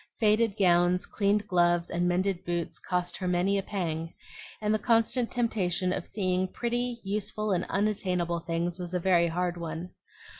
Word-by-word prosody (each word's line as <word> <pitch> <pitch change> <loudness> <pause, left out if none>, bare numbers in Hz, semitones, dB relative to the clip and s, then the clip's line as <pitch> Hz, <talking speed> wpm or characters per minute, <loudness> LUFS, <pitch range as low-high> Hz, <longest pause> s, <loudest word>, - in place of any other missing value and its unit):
Faded 215 -1 +3
gowns, 180 0 +3
cleaned 205 0 0
gloves, 175 -2 +2
and 175 +1 +1
mended 185 +1 0
boots 175 -2 -3
cost 180 -1 -2
her 185 - -3
many 180 +3 +2
a - - -1
pang, 165 -5 -3 0.5
and 210 0 +1
the 215 - +1
constant 230 +2 +2
temptation 185 -6 0
of - - -4
seeing 185 -2 0
pretty, 240 +3 -2
useful, 210 +1 -2
and 180 - +1
unattainable 185 -4 0
things 170 +1 -2
was 180 0 -4
a - - +2
very 175 -1 +3
hard 175 +1 -1
one. 165 +1 -5
185 Hz, 160 wpm, -28 LUFS, 175-210 Hz, 0.5 s, Faded